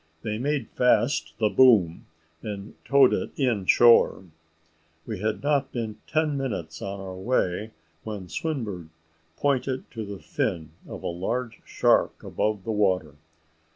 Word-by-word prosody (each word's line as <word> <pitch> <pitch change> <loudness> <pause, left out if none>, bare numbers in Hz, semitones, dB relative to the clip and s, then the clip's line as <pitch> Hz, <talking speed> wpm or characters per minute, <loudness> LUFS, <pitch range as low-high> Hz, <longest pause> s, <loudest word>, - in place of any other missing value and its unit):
They 105 -1 -3
made 140 -3 -1
fast 125 +3 +2
the 110 -1 +2
boom, 105 -11 +4 0.3
and 100 -1 -7
towed 140 -2 +5
it - - -1
in 115 -9 0
shore. 120 -5 +5 0.8
We 110 -4 -5
had 110 +4 -2
not 140 -2 +1
been 110 -3 -4
ten 155 -2 0
minutes 105 - -4
on 100 0 -5
our 95 -1 -7
way, 95 -1 -1 0.3
when 105 -4 -6
Swinburne 110 - -4 0.5
pointed 135 -2 -1
to 115 - -5
the 100 -1 -7
fin 80 -1 -3 0.2
of - - -8
a - - -2
large 115 +8 -3
shark - - +2
above 105 -2 -2
the 110 - -3
water. 95 -7 +1
110 Hz, 140 wpm, -26 LUFS, 95-130 Hz, 0.8 s, towed